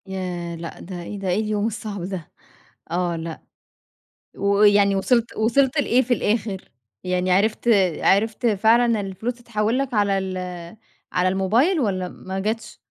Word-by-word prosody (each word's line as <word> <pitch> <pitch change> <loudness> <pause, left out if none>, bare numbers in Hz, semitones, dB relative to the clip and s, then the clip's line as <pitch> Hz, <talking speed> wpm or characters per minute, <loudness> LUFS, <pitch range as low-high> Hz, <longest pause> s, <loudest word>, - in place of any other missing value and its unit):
ياه! 180 -3 -4
لأ، 165 0 -8
ده 180 -1 -7
إيه 205 +3 -7
ده؟ 195 - -4
إيه 180 +3 +1
اليوم 215 -1 0
الصعب 210 -3 -5
ده؟! 180 -3 -6 0.6
آه. 175 0 0
لأ، 165 0 -6 1.0
ويعني 200 0 +4
وصلت 235 +4 +1
وصلت 255 +6 +2
لإيه 255 -2 +3
في 245 0 +1
الآخر؟ 210 -3 -2 0.3
يعني 180 0 0
عرفت 215 +5 +1 0.3
عرفت 220 +4 +2
فعلًا 225 +2 +3
الفلوس 200 +5 -4
تتحول 230 -1 -1
لَك 270 -2 -2
على 200 -2 +2
ال 190 -1 -3 0.7
على 180 0 +2
الموبايل 225 - +2
والّا 185 -6 -1
ما 190 +1 -7
جاتش؟ 220 +3 -3
205 Hz, 145 wpm, -22 LUFS, 185-225 Hz, 1.0 s, ويعني